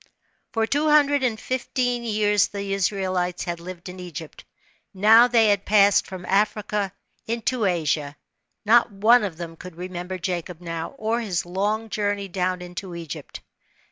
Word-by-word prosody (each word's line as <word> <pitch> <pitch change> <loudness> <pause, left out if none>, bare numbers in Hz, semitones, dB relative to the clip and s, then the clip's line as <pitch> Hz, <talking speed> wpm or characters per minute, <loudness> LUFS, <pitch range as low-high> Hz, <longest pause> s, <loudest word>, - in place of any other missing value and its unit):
Fort 225 -1 -1
two 300 +2 +2
hundred 290 -1 +4
and 230 -4 0
fifteen 245 -1 -1
years 210 -3 +2
the 200 -1 -4
Israelites 185 -2 -1
had 170 -1 -4
lived 175 +1 -9
in 180 0 -8
Egypt. 170 -3 -8 0.5
Now 220 +5 +7
they 230 -3 +4
had 200 -1 +2
passed 205 -1 +4
from 185 -1 -8
Africa, 205 0 0 0.4
into 230 0 -1
Asia. 155 -5 0 0.5
Not 235 +2 +5
one 220 +4 +4
of 185 -6 -4
them 165 -1 -7
could 180 +1 -11
remem 180 0 -6
ber 185 0 -4
Jacob 175 -1 -4
now, 165 -2 -5
or 225 +2 -1
his 185 -7 -2
long 205 +5 -1
journey 205 -1 -1
down 180 -1 -2
into 180 0 -7
Egypt. 165 -3 -8
195 Hz, 155 wpm, -24 LUFS, 180-220 Hz, 0.5 s, Now